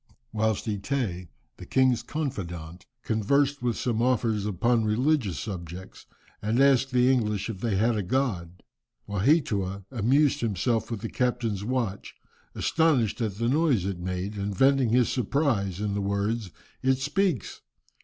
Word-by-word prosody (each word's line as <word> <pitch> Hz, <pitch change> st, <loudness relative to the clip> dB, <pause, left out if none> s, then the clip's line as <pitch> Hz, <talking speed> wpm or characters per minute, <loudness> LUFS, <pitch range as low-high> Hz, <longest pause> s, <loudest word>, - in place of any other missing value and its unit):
Whilst 110 Hz, -1 st, 0 dB
Eteé, 105 Hz, -4 st, -2 dB, 0.3 s
the -, -, -10 dB
king's 130 Hz, -2 st, +3 dB
confidant, 90 Hz, -, -5 dB, 0.2 s
conversed 140 Hz, +6 st, +1 dB
with 120 Hz, -2 st, -1 dB
some 115 Hz, -2 st, -1 dB
officers 115 Hz, -4 st, +1 dB
upon 115 Hz, +4 st, +1 dB
religious 110 Hz, -, +1 dB
subjects, 90 Hz, -2 st, -7 dB, 0.3 s
and 110 Hz, +4 st, 0 dB
asked 135 Hz, -1 st, +4 dB
the 125 Hz, 0 st, +4 dB
English 105 Hz, -4 st, 0 dB
if 95 Hz, -, -8 dB
they 110 Hz, -1 st, -1 dB
had 115 Hz, +4 st, +2 dB
a 105 Hz, -, 0 dB
god, 95 Hz, -6 st, -2 dB, 0.4 s
Waheatua 100 Hz, -, +1 dB
amused 135 Hz, +5 st, +2 dB
himself 115 Hz, +1 st, 0 dB
with 115 Hz, -4 st, -4 dB
the 115 Hz, -, -4 dB
captain's 115 Hz, -5 st, -1 dB
watch. 115 Hz, -4 st, -3 dB, 0.4 s
Astonished 140 Hz, -10 st, +1 dB
at 105 Hz, -4 st, -1 dB
the 115 Hz, +3 st, -1 dB
noise 135 Hz, -, +2 dB
it 95 Hz, -3 st, -3 dB
made, 90 Hz, +3 st, -4 dB
and 100 Hz, -1 st, -3 dB
venting 135 Hz, -1 st, +4 dB
his 125 Hz, +1 st, +3 dB
surprise 120 Hz, -, 0 dB
in 105 Hz, -1 st, -1 dB
the 100 Hz, -, -1 dB
words, 100 Hz, +2 st, -1 dB, 0.3 s
"It 130 Hz, 0 st, +2 dB
speaks!" 170 Hz, -, -1 dB
110 Hz, 145 wpm, -27 LUFS, 100-130 Hz, 0.4 s, asked